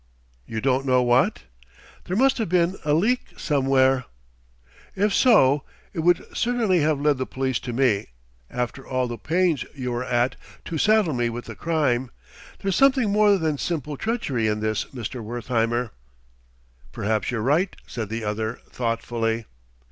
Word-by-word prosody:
"You 110 -1 -4
don't 135 +1 +1
know 125 -1 +4
what?" 120 +1 +2 0.6
"There 185 - -2
must 265 +1 +3
have 220 - -1
been 180 +1 +2
a 150 -1 +2
leak 230 +10 0
somewhere 135 -3 +2 0.5
" - - -29
"If 210 - +1
so, 150 - +5 0.3
it 175 - -4
would 175 +2 +3
certainly 230 -7 +2
have 155 -1 +1
led 145 -2 +2
the 130 - -2
police 130 -2 -1
to 125 - -6
me, 120 -5 +1 0.4
after 125 +2 -3
all 130 -1 0
the 120 -1 -6
pains 170 -3 +1
you 125 -3 -3
were 120 +1 -2
at 125 0 0 0.3
to 160 - -3
saddle 215 -5 +3
me 120 -1 0
with 120 +1 -6
the - - -7
crime. 140 -7 0 0.5
There's 195 -2 0
something 260 -4 +4
more 210 -1 +4
than 155 -5 -1
simple 150 -4 -3
treachery 140 - -1
in 105 0 0
this, 110 0 -1
Mr. 120 -1 -6
Wertheimer." 120 0 -1 1.0
"Perhaps 110 +1 -1
you're 115 -4 -2
right," 155 - +1
said 110 -4 -5
the 115 +1 -4
other 110 +2 -2
thoughtfully. 115 -1 -2
130 Hz, 160 wpm, -24 LUFS, 120-170 Hz, 1.0 s, so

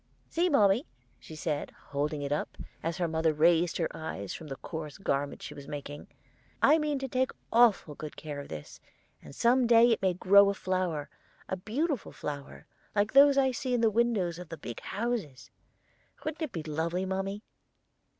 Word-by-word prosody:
'See, 350 +2 +2
mommy,' 220 - +4 0.3
she 160 - -11
said, 155 -2 -2 0.2
holding 145 +1 -2
it 140 - -3
up, 150 - -2 0.2
as 165 0 -2
her 175 - 0
mother 160 0 +1
raised 165 +2 +3
her 165 - +1
eyes 100 -11 -5
from 160 - -8
the 135 - -5
coarse 155 0 -7
garment 140 -6 -2
she 145 - -7
was 140 -1 -11
making, 145 0 -7 0.6
'I 305 +3 +6
mean 300 -2 0
to 270 0 -3
take 260 0 +1 0.2
awful 225 -9 +4
good 150 +1 -8
care 150 -2 -6
of 140 - -8
this, 75 -2 -9 0.4
and - - -12
some 245 +1 +3
day 235 0 +6
it 225 - +1
may 185 -2 +2
grow 200 +2 +6
a 200 - -1
flower, 185 -7 -1 0.4
a - - -2
beautiful 250 - -2
flower, 145 -1 -7 0.3
like 205 +1 +1
those 280 0 +7
I 265 -1 +4
see 255 0 -1
in 240 - +1
the 225 -1 +4
windows 205 -7 +1
of 180 -2 -9
the 165 - -6
big 120 -6 -7
houses. 195 - -4 0.7
Wouldn't 310 0 -3
that 315 -6 -3
be 165 -6 -4
lovely, 165 +4 -2
mommy?' 195 +2 -3
185 Hz, 185 wpm, -30 LUFS, 150-235 Hz, 0.7 s, those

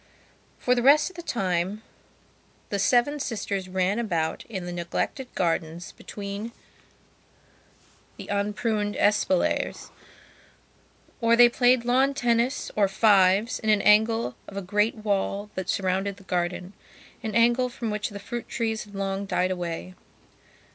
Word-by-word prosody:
For 250 - +2
the 245 - +1
rest 295 +7 +5
of - - -23
the 345 - -6
time 195 - -2 0.9
the 200 - -2
seven 250 +7 +2
sisters 200 -7 -3
ran 190 +3 0
about 170 -8 -1
in 190 -6 -6
the 175 - -5
neglected 175 +9 -3
gardens 165 -1 -2
between 205 +3 -7 1.6
the - - -9
unpruned 205 +1 -1
espaliers. 205 -3 +1 1.3
Or 230 0 +4
they 240 0 +8
played 245 0 +3
lawn 265 +3 +2
tennis 245 +1 0
or 205 -2 +3
fives 200 +1 +3
in 220 - -2
an 210 -2 +3
angle 220 - +3
of 200 - -9
a 200 - -3
great 210 +4 +1
wall 205 -1 -2
that 190 -1 -5
surrounded 195 +1 -1
the 200 - -16
gardenan 180 +1 -2 0.5
angle 235 +3 +2
from 235 -2 -4
which 210 0 -2
the 205 - -8
fruit 235 +4 -6
trees 225 -2 -2
had 205 -1 -14
long 195 0 -3
died 185 -1 0
away. 175 0 -4
205 Hz, 135 wpm, -26 LUFS, 190-235 Hz, 1.6 s, they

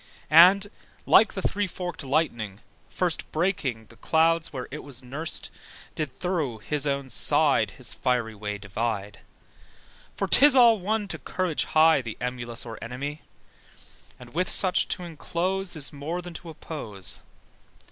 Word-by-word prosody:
And, 180 +5 +8 0.4
like 220 - +5
the 195 - -4
three 205 0 0
forked 180 -2 -6
lightning, 120 -8 -1 0.3
first 180 -3 -2
Breaking 150 - -1
the 115 - -19
clouds 165 +1 +2
where 130 -3 -6
it 150 - -5
was 135 -3 -10
nursed, 145 +6 -3 0.4
Did 150 -4 -3
thorough 160 -10 -1
his 145 +6 -2
own 140 -2 -2
side 145 -4 +3
His 125 - -4
fiery 125 -3 -1
way 105 0 -5
divide. 105 0 -4 1.0
(For - - -1
'tis 285 0 +7
all 235 -4 +6
one 210 +2 -1
to - - -5
courage 180 -4 -2
high 160 -2 +4
The 115 -3 -7
emulous 120 -2 -4
or 115 -2 -8
enemy: 140 +6 -5 1.0
And 120 -1 -13
with 180 +3 0
such 185 -2 +3
to 180 - -3
inclose 175 +3 -2
Is 145 -2 -3
more 150 +5 -4
than 175 -1 -8
to 165 +1 -9
oppose.) 115 - -7
150 Hz, 145 wpm, -26 LUFS, 120-175 Hz, 1.0 s, And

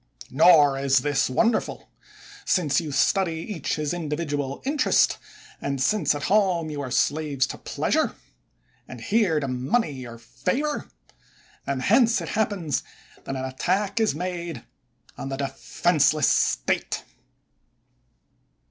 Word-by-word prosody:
Nor 145 -2 +6
is 135 -1 +3
this 145 -1 +1
wonderful; 225 - 0 0.6
since 155 -5 +1
you 155 -3 -6
study 165 +6 +2
each 165 -1 -3
his 150 0 -2
individual 150 -4 -3
interest, 290 +2 +2 0.4
and 140 -1 -2
since 155 +2 +2
at 145 - -5
home 185 -3 +2
you 145 -1 -4
are 130 - -5
slaves 145 0 +1
to - - -8
pleasure, - - -1 0.7
and 125 - -9
here 185 - +1
to 140 - -3
money 130 - -1
or 115 0 -10
favor; 265 - -3 0.8
and 135 -2 -2
hence 235 +2 +4
it - - -6
happens 200 -9 -1 0.4
that 135 - -4
an 130 0 -3
attack 185 - -1
is 220 -6 +1
made 175 -1 -5 0.6
on 135 - -5
the 135 - -4
defenseless 150 +1 +1
State. - - 0
155 Hz, 125 wpm, -24 LUFS, 135-185 Hz, 0.8 s, Nor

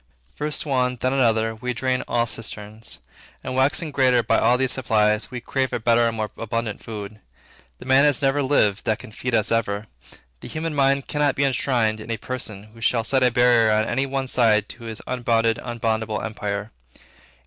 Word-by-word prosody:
First, 150 +1 -1
one; 125 -3 0
then, 130 +2 0
another; 115 -4 +2
we 125 +3 -4
drain 130 +1 0
all 120 -1 +1
cisterns, 110 -1 -6 0.5
and, 130 - -4
waxing 145 +4 +1
greater 130 -3 +3
by - - +2
all 125 - +3
these 130 0 +1
supplies, 105 -4 +1
we 125 - -5
crave 130 +2 -1
a - - -2
better 115 +1 +3
and 115 -1 -3
more 110 -1 -3
abundant 115 -1 -3
food. 105 -1 -8 0.6
The - - -12
man 130 +1 +5
has 145 -3 +3
never 140 0 +1
lived 115 -7 +2
that 110 - +1
can - - -12
feed 125 +2 -2
us 110 0 +1
ever. 105 -2 0 0.5
The - - -10
human 160 0 -4
mind 140 -1 +2
cannot 145 -2 +1
be 140 - +1
enshrined 125 -5 +1
in 110 - -10
a 115 - -1
person, 110 -3 -5
who 115 - -15
shall 115 +1 +2
set 130 +3 +1
a 125 - +5
barrier 120 -2 +4
on 110 0 +2
any 135 +4 -1
one 135 0 -2
side 110 -4 +3
to 115 -1 -6
this 110 -1 -7
unbounded, 115 -2 +1
unboundable 110 -2 -2
empire. 105 -1 -4
120 Hz, 190 wpm, -23 LUFS, 110-130 Hz, 0.6 s, man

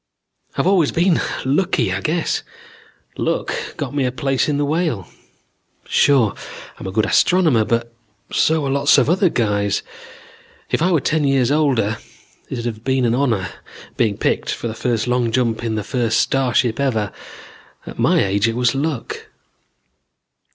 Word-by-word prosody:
"I've - - +1
always 185 -6 +3
been 170 0 +2 0.2
lucky, 135 - +1
I 95 - -2
guess. 165 +1 -1 0.8
Luck - - -1 0.2
got - - -4
me 145 -2 0
a 125 - 0
place 135 +3 0
in 145 - 0
the 145 - +1
Whale. 150 - -1 0.8
Sure 130 -8 +3 0.5
I'm - - -6
a - - -4
good 110 +3 +1
astronomer 160 -3 +3
but 115 +1 -1 0.4
so 160 -2 +2
are 135 - -1
lots 140 +1 +4
of 135 +3 +3
other 185 0 +3
guys. 105 -6 0 0.9
If - - +1
I 180 +3 +3
were 165 -5 +3
ten 155 -1 0
years 135 -2 +2
older, 130 -8 +1 0.5
it - - -4
would 120 -1 -5
have 110 -2 -4
been 130 -1 +1
an 115 - +2
honor, 115 -9 0 0.5
being 110 -4 +1
picked - - -1
for - - -3
the 110 - -4
first 115 -1 -1
long 125 -1 0
jump 115 -1 0
in 115 -2 -1
the 105 - -2
first 120 -4 0
starship 125 -2 +1
ever. 110 -7 0 0.7
At - - -10
my - - +3
age 100 +3 +1
it 115 - -1
was 125 0 +2
luck. 140 -2 -3
125 Hz, 165 wpm, -20 LUFS, 115-145 Hz, 0.9 s, lots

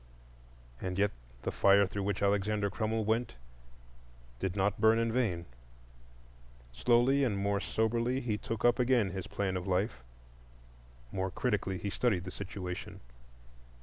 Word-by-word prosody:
And 90 0 -3
yet 100 +1 +3 0.3
the - - -1
fire 100 0 +5
through 100 +2 -4
which 100 0 -1
Alexander 100 0 +1
Crummell 110 +1 -1
went 110 - 0 1.0
did 95 +4 -2
not 100 +1 0
burn 110 0 +6
in 115 0 +1
vain. 105 -9 0 1.3
Slowly 120 - +3
and 110 -6 +1
more 100 0 0
soberly 115 +4 0
he 120 -5 -1
took 115 +2 -3
up 120 +1 +4
again 120 -6 +3
his 95 -2 -5
plan 95 -2 -2
of 90 +1 -3
life. 90 - 0 1.1
More 95 0 -1
critically 100 -4 -1
he 100 +2 -4
studied 100 -7 +1
the 95 - -6
situation. 90 -2 -6
100 Hz, 140 wpm, -32 LUFS, 95-115 Hz, 1.3 s, burn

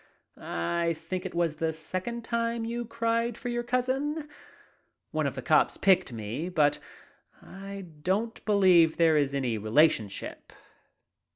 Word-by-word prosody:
I 165 - -1
think 180 +3 -4
it - - -11
was 170 -3 0
the 160 0 0
second 185 +9 -5
time 230 0 -1
you 235 +1 -3
cried 230 0 -1
for 245 - -5
your 240 0 -1
cousin. 260 +5 -1 0.8
One - - 0
of - - -4
the - - -6
cops - - +3
picked 185 -6 +3
me, 115 - -4
but 150 -5 +2 0.6
I 195 0 -9 0.2
don't 210 +7 -1
believe 185 -6 +5
there 165 -2 +4
is 140 -2 +1
any 125 -5 -1
relationship." 110 -2 +1
185 Hz, 135 wpm, -28 LUFS, 155-230 Hz, 0.8 s, believe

